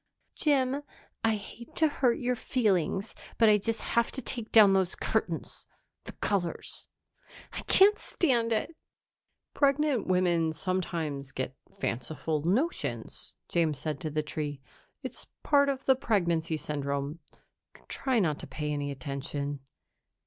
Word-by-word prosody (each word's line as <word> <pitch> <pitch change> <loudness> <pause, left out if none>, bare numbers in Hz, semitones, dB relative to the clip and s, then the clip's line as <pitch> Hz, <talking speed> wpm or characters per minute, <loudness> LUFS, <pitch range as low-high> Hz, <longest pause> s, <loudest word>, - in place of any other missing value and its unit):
"Jim, 275 -2 +2 0.4
I 225 -1 +3
hate 230 +3 -10
to 320 - +4
hurt 255 -5 +2
your 250 0 0
feelings, 200 -5 0 0.2
but 225 -2 +6
I 210 0 +6
just 225 +2 -2
have 235 0 +1
to 265 - -3
take 235 -4 -3
down 210 -3 +8
those 190 -2 +2
curtains. - - -2 0.4
The - - -8
colors 190 -5 -2 0.6
I - - -4
can't 405 +2 +6
stand 240 -8 +1
it!" 230 +9 0 0.8
"Pregnant 280 -3 +2
women 175 -3 +2
sometimes 160 -5 -2
get 130 0 -4 0.2
fanciful 150 +5 -2
notions," 235 - -1
James 160 -4 +1
said 150 0 -3
to 155 - -3
the 155 +1 -1
tree. 150 -1 -4 0.4
"It's - - -4 0.2
part 280 -1 +4
of 270 -1 -2
the 265 - +6
pregnancy 170 - +1
syndrome. 140 +1 -3 0.7
Try 260 -2 0
not 160 -9 +2
to - - -7
pay 150 -1 -3
any 145 -1 -2
attention." 140 0 -4
185 Hz, 135 wpm, -29 LUFS, 150-245 Hz, 0.8 s, down